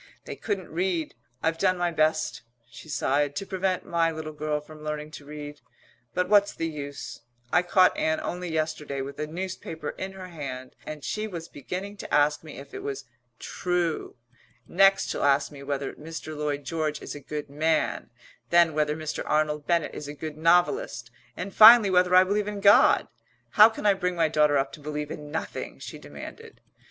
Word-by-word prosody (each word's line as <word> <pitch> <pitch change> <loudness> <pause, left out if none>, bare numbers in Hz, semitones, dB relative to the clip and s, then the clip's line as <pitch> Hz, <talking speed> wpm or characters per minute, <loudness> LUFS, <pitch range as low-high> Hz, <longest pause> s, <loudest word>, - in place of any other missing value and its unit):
They - - -6
couldn't 200 -5 -4
read. 175 -2 -1 0.3
I've 165 0 0
done 185 -1 +2
my 175 -1 0
best," 155 0 +1 0.3
she 125 +6 -13
sighed, 145 0 0
"to 195 - -3
prevent 190 -1 -1
my 170 -1 +1
little 155 -1 -6
girl 150 0 -2
from 155 +1 -13
learning 150 0 -4
to 145 - -10
read, 150 0 -8 0.5
but 180 0 +1
what's 205 0 +4
the 165 - -2
use? 145 -5 -7 0.3
I 175 - +6
caught 185 +1 +4
Ann 160 0 0
only 180 0 -4
yesterday 155 -3 -2
with 140 +1 -7
a 150 - -2
newspaper 165 -2 -5
in 190 0 -4
her 185 -1 -9
hand 130 -6 -7
and 155 -2 -7
she 215 0 -2
was 170 -5 -7
beginning 185 +8 -6
to - - -8
ask 150 +1 +3
me 155 - -10
if 140 - -11
it - - -6
was 140 -1 -5 0.3
'true.' 175 -3 -2 0.5
Next 195 +2 +4
she'll - - -3
ask 140 +1 +3
me 140 -2 -11
whether 140 0 -3
Mr. 155 0 -8
Lloyd 145 -1 -2
George 155 +1 -2
is - - -7
a 145 - -8
good 150 +1 -6
man, 155 +2 0 0.4
then 170 -2 +5
whether 150 0 +1
Mr. 155 -1 -4
Arnold 150 -1 0
Bennett 170 -3 +1
is 150 - -7
a 145 - -7
good 155 +1 -6
novelist, 175 - +2 0.3
and 200 - -5
finally 220 -2 +9
whether 180 0 +4
I 185 - +9
believe 205 +2 0
in 205 -1 -4
God. 200 +1 +6 0.4
How 215 +2 +8
can 220 - -8
I 205 - +6
bring 180 -2 -2
my 165 -2 +2
daughter 150 -1 +3
up 135 0 0
to - - -9
believe 150 0 -5
in 150 -1 -7
nothing?" 160 +2 -5
she - - -9
demanded. 455 -1 -11
160 Hz, 190 wpm, -26 LUFS, 150-180 Hz, 0.5 s, finally